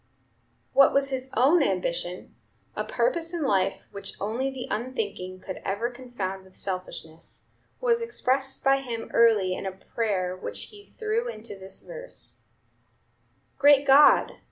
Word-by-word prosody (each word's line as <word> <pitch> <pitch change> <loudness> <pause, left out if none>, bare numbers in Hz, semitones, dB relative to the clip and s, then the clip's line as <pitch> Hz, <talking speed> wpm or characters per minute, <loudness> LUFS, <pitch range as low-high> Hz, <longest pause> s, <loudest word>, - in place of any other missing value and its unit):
What 275 0 +6
was 275 0 +3
his 260 0 -3
own 300 +7 +5
ambition 180 -5 -2 0.4
a - - -1
purpose 345 -9 0
in 330 - -2
life 195 -6 +1
which 200 -1 -7
only 230 +7 -1
the 265 -2 -6
unthinking 205 -6 -4
could 190 - -7
ever 220 +5 -1
confound 240 -7 -5
with 190 0 -20
selfishness 180 -4 -7 0.3
was 470 -1 +2
expressed 270 - 0
by 270 0 +5
him 235 -4 -5
early 215 -5 +4
in 195 - -4
a - - -2
prayer 190 -1 -2
which 185 - -7
he 410 -1 -16
threw 450 +2 -1
into 220 - -7
this 190 0 -9
verse: - - -5 1.1
"Great 285 0 +6
God! 280 +2 +6
240 Hz, 140 wpm, -26 LUFS, 190-275 Hz, 1.1 s, What